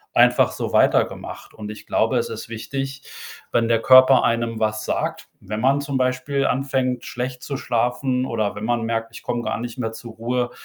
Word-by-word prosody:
einfach - - +5
so - - -4
weitergemacht - - +1
und 105 -1 -7
ich 105 - -11
glaube, - - +2
es - - -2
ist - - -6
wichtig, 135 +4 -5 0.5
wenn 115 -1 +2
der 115 -1 +2
Körper 130 0 +7
einem 115 -1 0
was 110 0 -1
sagt - - -2 0.2
wenn 105 0 -4
man 135 +3 +3
zum 140 -2 -2
Beispiel 130 +2 0
anfängt, 130 -2 0
schlecht 125 +1 -4
zu 140 -2 -4
schlafen 125 +2 0
oder 110 -4 -1
wenn 100 - -6
man 120 -1 0
merkt: 115 0 -2
„Ich - - -10
komme 120 -1 -2
gar 115 - -2
nicht 120 +1 -6
mehr 115 -2 -2
zur 115 0 -10
Ruhe“, 120 +2 -2
120 Hz, 190 wpm, -22 LUFS, 115-130 Hz, 0.5 s, Körper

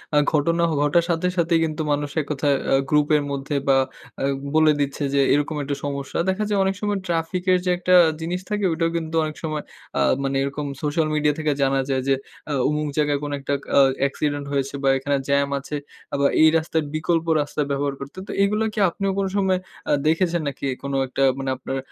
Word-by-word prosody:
আ - - +5 0.2
ঘটনা 165 +3 +2
অ - - 0
ঘটার 170 +3 +3
সাথে 170 +2 +1
সাথেই 165 -1 +3
কিন্তু 155 0 -3
মানুষ 145 0 0
এক - - -7
কথায় 140 0 +1 0.2
আ - - +6
গ্রুপের 150 0 +3
মধ্যে 140 +1 -3
বা 135 -1 +5 0.4
আ - - -1 0.3
বলে 155 -1 +6
দিচ্ছে 140 +1 -2
যে 140 - +4
এরকম 145 +2 0
একটু 140 +1 -2
সমস্যা। 140 +1 -3
দেখা 195 +3 0
যায় 205 -1 +1
অনেক 190 0 0
সময় 205 -1 0
ট্রাফিক 170 +2 -1
এর 180 - +4
যে - - +1
একটা 180 +1 +1 0.3
জিনিস 180 +3 -3
থাকে 210 -2 0
ওটাও 165 0 0
কিন্তু 160 0 -4
অনেক 155 0 -4
সময় 155 -1 -3 0.3
অ্যাঁ - - +3
মানে 135 0 -1
এরকম 140 +1 -3 0.2
সোশ্যাল 155 +1 +1
মিডিয়া 150 -1 +2
থেকে 155 -1 +1
জানা 135 0 +2
যায় 130 -1 +1
যে 135 - +4 0.3
আ - - -1 0.2
অমুক 150 0 -1
জায়গায় 145 -1 +2
কোন 145 - -3
একটা 140 +1 -2 0.2
অ্যাঁ 135 -1 +6
অ্যাক্সিডেন্ট 145 +1 -1
হয়েছে 140 0 -1
বা 135 - +4
এখানে 140 +1 -1
জ্যাম 140 0 +2
আছে 150 +2 -6 0.4
আ - - +1
বা 140 - +5
এই 155 - +8
রাস্তার 160 -1 -1
বিকল্প 165 +1 0 0.2
রাস্তা 145 +1 -3
ব্যবহার 140 0 0
করতে। 140 +6 -9
তো - - -5
এগুলো 210 +2 +1
কি - - -3
আপনিও 195 +3 -2
কোন 195 - +1
সময় 190 -2 +2 0.3
অ্যাঁ 145 - +2
দেখেছেন 170 +1 +2
নাকি 140 - -5 0.2
কোন 140 0 -4
একটা 135 +1 -1 0.2
মানে 135 0 -2
আপনার 135 +1 -4
150 Hz, 210 wpm, -23 LUFS, 140-170 Hz, 0.4 s, এই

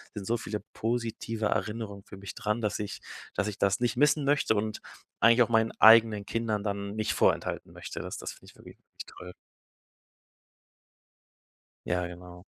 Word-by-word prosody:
sind 100 -2 -5
so 120 +1 +1
viele 105 -1 -5
positive 115 -1 -2
Erinnerungen 105 -3 -3
für 100 - -11
mich 100 -1 -8
dran, 105 +2 -1
dass 105 - -1
ich 105 -1 -5 0.3
dass 105 +1 0
ich 105 - -4
das 100 +4 +2
nicht 120 0 0
missen 150 +1 +4
möchte 145 -5 +3
und 110 +1 -2 0.4
eigentlich 115 +1 +6
auch 120 - -4
meinen 115 -1 +3
eigenen 110 -2 +7
Kindern 110 -3 -1
dann 100 0 -3
nicht 110 -1 0
vorenthalten - - +1
möchte. - - -7
Das - - -6
das - - -6
finde - - -16
ich - - -26
wirklich - - -14 0.3
toll. 90 0 -11 2.5
Ja, 90 0 0
genau. 90 0 -11
110 Hz, 160 wpm, -29 LUFS, 100-115 Hz, 2.5 s, eigenen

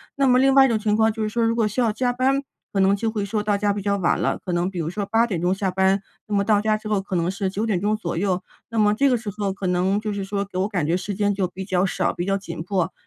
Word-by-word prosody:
那 275 - +2
么 250 0 +5
另 270 +1 +4
外 270 -1 +8
一 - - +4
种 225 -2 +1
情 210 -1 +1
况 220 0 +4
就 220 - -5
是 215 - 0
说 230 +2 0
如 230 - +2
果 225 -2 +2
需 215 +4 -4
要 235 -3 +3
加 245 +3 0
班， 265 +3 +1 0.3
可 195 - 0
能 195 +1 +4
就 220 +2 -1
会 215 -2 -2
说 210 +1 -1
到 210 -1 +1
家 205 0 +1
比 200 0 -3
较 200 0 0
晚 175 -3 +1
了， - - 0
可 185 - -4
能 175 +1 0
比 185 -2 -6
如 160 -1 -2
说 200 +3 -3
8 225 +3 +2
点 185 -7 -2
钟 180 +2 +2
下 195 -1 -1
班。 190 +1 +2 0.3
那 210 - -2
么 200 - +2
到 205 0 +3
家 215 0 +1
之 215 0 -6
后 210 -2 +2
可 190 -1 -5
能 170 0 +1
是 195 -1 -2
9 210 +4 -2
点 205 -5 0
钟 210 +3 +1
左 175 -6 -4
右， 185 0 0 0.3
那 230 - -5
么 210 -1 +4
这 275 +5 +3
个 250 - +3
时 220 -2 -6
候 200 -2 -1
可 195 -1 -4
能 185 +3 +1
就 215 -1 -3
是 200 -1 -3
说 200 0 -2
给 195 -2 -8
我 190 +2 +1
感 190 -7 -1
觉 165 +4 +1
时 195 +2 -4
间 205 0 +1
就 195 -2 0
比 190 +2 -7
较 185 0 +1
少， 190 - 0
比 175 - -4
较 195 +1 +1
紧 170 -5 -7
迫， 180 -1 -1
200 Hz, 345 characters per minute, -23 LUFS, 190-215 Hz, 0.3 s, 外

